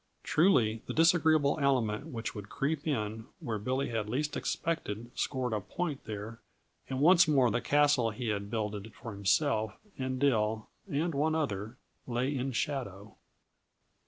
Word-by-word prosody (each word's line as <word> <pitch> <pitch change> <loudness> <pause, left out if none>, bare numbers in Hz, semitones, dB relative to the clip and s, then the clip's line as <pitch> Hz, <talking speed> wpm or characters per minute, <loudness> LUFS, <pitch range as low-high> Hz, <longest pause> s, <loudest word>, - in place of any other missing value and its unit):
Truly, 120 - +3
the - - -4
disagreeable 160 -3 +4
element 130 -2 +1
which 115 -7 -4
would 105 -2 -8
creep 150 +2 -2
in 110 -4 -2
where 110 -3 -3
Billy 130 +6 -1
had 110 -2 -2
least 145 +6 -1
expected 120 -9 -3
scored 130 -4 -1
a 105 - -1
point 150 - -4
there, 110 +2 -6 0.5
and 130 -1 -2
once 170 +4 +6
more 135 -6 +4
the - - 0
castle 145 -5 +3
he 115 +1 -4
had 100 -1 -2
builded 105 -1 -4
for 115 - -8
himself 105 +2 +1 0.2
and 130 0 -2
Dill 110 -5 +1 0.2
and 160 +4 0
one 155 +3 +1
other 110 -6 -2 0.3
lay 130 +3 -1
in 135 +1 -1
shadow. 110 -6 -3
125 Hz, 150 wpm, -31 LUFS, 110-145 Hz, 0.5 s, once